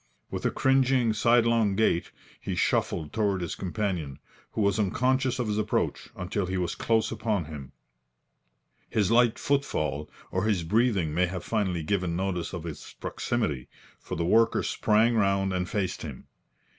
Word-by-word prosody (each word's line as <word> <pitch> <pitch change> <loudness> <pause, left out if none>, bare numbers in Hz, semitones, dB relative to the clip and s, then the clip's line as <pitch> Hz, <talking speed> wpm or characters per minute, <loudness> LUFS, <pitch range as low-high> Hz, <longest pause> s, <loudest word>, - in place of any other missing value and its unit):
With - - -1
a - - +2
cringing, 130 -3 +3
sidelong 115 -2 +3
gait, 100 -5 +2 0.3
he - - -4
shuffled 75 -2 0
toward 100 -4 +1
his 85 - -3
companion, 90 -8 -3 0.4
who - - -1
was 100 +1 +2
unconscious 130 +5 +1
of 125 -3 -1
his 105 0 0
approach 105 0 -1
until 95 +1 -2
he 95 +1 -2
was 90 -2 -1
close 115 -1 +1
upon 110 -5 -1
him. 70 -4 -8 1.2
His 105 -1 +1
light 120 -1 +4
footfall 75 - -1 0.2
or 95 +2 0
his 100 -6 +1
breathing 100 -4 +1
may 90 +3 +2
have 90 0 -5
finally 95 -7 -1
given 90 -1 0
notice 90 -1 -2
of 90 -4 -5
his 80 -4 -8
proximity, 75 - -2 0.3
for - - -6
the 85 - -1
worker 115 +5 +3
sprang 110 +2 +2
round 100 -2 +2
and 90 -1 -1
faced 95 -3 -2
him. 70 -5 -8
100 Hz, 155 wpm, -27 LUFS, 90-115 Hz, 1.2 s, light